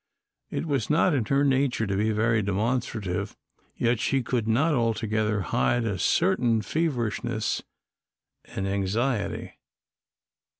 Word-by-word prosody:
It -, -, -3 dB
was 140 Hz, -8 st, -1 dB
not 165 Hz, +3 st, +3 dB
in 130 Hz, -6 st, +1 dB
her 140 Hz, +4 st, +2 dB
nature 130 Hz, -4 st, +1 dB
to 100 Hz, -1 st, -1 dB
be 105 Hz, +3 st, +1 dB
very 110 Hz, +1 st, +2 dB
demonstrative, 105 Hz, -2 st, -2 dB, 0.4 s
yet 120 Hz, -1 st, +1 dB
she 130 Hz, +2 st, +1 dB
could 120 Hz, -2 st, -1 dB
not 140 Hz, +9 st, +2 dB
altogether 110 Hz, -3 st, 0 dB
hide 90 Hz, -, +1 dB
a 100 Hz, -4 st, -2 dB
certain 125 Hz, -, +2 dB
feverishness 125 Hz, -, -1 dB, 0.8 s
and 95 Hz, -, -4 dB
anxiety. 100 Hz, +4 st, -1 dB
115 Hz, 120 wpm, -26 LUFS, 105-135 Hz, 0.8 s, not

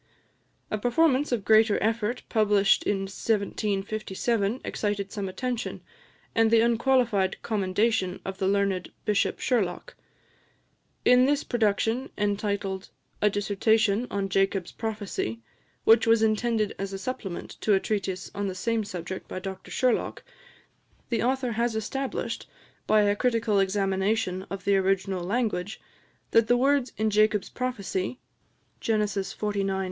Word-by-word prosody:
A 215 Hz, -, -1 dB
performance 275 Hz, +4 st, +2 dB
of 225 Hz, -6 st, -1 dB
greater 220 Hz, -1 st, +5 dB
effort, 225 Hz, +2 st, -1 dB
published 205 Hz, -3 st, +3 dB
in 200 Hz, -1 st, +1 dB
1757, 205 Hz, +2 st, -1 dB
excited 205 Hz, -2 st, -2 dB
some 200 Hz, -3 st, -3 dB
attention, 245 Hz, +5 st, -3 dB, 0.5 s
and 225 Hz, -1 st, +4 dB
the 225 Hz, 0 st, +5 dB
unqualified 235 Hz, -4 st, +2 dB
commendation 200 Hz, -2 st, 0 dB
of 190 Hz, 0 st, -5 dB
the 190 Hz, -, +1 dB
learned 195 Hz, -2 st, 0 dB
Bishop 210 Hz, -2 st, +1 dB
Sherlock. 240 Hz, -, -1 dB, 1.1 s
In 250 Hz, +1 st, +6 dB
this 290 Hz, +1 st, +1 dB
production, 225 Hz, +2 st, 0 dB
entitled 200 Hz, -2 st, -2 dB, 0.3 s
"A 210 Hz, -, +5 dB
Dissertation 205 Hz, +2 st, +1 dB
on 200 Hz, -1 st, -1 dB
Jacob's 195 Hz, -1 st, 0 dB
Prophecy," 205 Hz, -, -4 dB, 0.4 s
which 225 Hz, +1 st, +5 dB
was 225 Hz, -1 st, +5 dB
intended 220 Hz, -1 st, +1 dB
as 195 Hz, 0 st, -4 dB
a -, -, -3 dB
supplement 195 Hz, -3 st, -5 dB
to 210 Hz, -, +3 dB
a -, -, +3 dB
treatise 190 Hz, -2 st, -3 dB
on 200 Hz, 0 st, -2 dB
the 190 Hz, -, -4 dB
same 230 Hz, +3 st, 0 dB
subject 185 Hz, -1 st, -6 dB
by -, -, -6 dB
Dr 190 Hz, +1 st, -7 dB
Sherlock, 255 Hz, -2 st, 0 dB, 0.9 s
the 235 Hz, -, 0 dB
author 255 Hz, 0 st, 0 dB
has 230 Hz, 0 st, 0 dB
established, 265 Hz, +5 st, -3 dB, 0.4 s
by 215 Hz, -1 st, +5 dB
a 205 Hz, 0 st, +2 dB
critical 230 Hz, -3 st, +1 dB
examination 195 Hz, 0 st, 0 dB
of 195 Hz, -1 st, -6 dB
the 200 Hz, -1 st, +4 dB
original 190 Hz, -1 st, 0 dB
language, 205 Hz, -1 st, -1 dB, 0.5 s
that 230 Hz, -1 st, +4 dB
the 245 Hz, -, +4 dB
words 275 Hz, 0 st, +2 dB
in 220 Hz, 0 st, +1 dB
Jacob's 210 Hz, -1 st, +2 dB
prophecy 230 Hz, -4 st, -3 dB, 0.6 s
(Gen. 220 Hz, -2 st, +1 dB
xlix. 200 Hz, -2 st, -2 dB
210 Hz, 130 wpm, -27 LUFS, 195-230 Hz, 1.1 s, In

